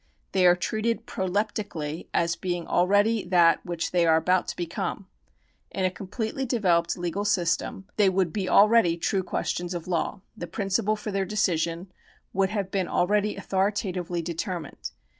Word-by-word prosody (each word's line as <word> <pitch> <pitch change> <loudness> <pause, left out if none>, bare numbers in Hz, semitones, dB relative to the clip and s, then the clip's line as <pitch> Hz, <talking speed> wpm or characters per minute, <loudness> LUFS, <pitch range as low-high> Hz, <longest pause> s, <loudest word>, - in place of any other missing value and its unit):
They 185 -2 +4
are 175 - +6
treated 225 +5 -2
proleptically 190 -7 -3
as 170 0 +1
being 175 -2 -3
already 205 +4 +3
that 175 -2 +4
which 170 -2 -3
they 175 -1 +3
are 160 - +5
about 180 +3 +2
to - - -4
become. 170 -1 -4 0.6
In 190 - -1
a 185 - +1
com 190 +1 -9
pletely 225 +6 -3
developed 180 -9 +1
legal 175 +3 -2
system 190 -1 0
they 205 -3 +5
would 185 -3 0
be 190 -3 -2
already 205 -5 +5
true 190 +3 0
questions 175 -1 -3
of 170 -1 -6
law; 180 +2 -1
the 175 - -6
principle 200 +2 0
for 210 0 -6
their 195 0 0
decision 180 -3 -1 0.4
would 190 0 +2
have 200 -2 -3
been 190 -3 0
already 205 +3 +1
authoritatively 190 -3 -1
determined. 170 -1 -5
185 Hz, 160 wpm, -26 LUFS, 175-205 Hz, 0.6 s, are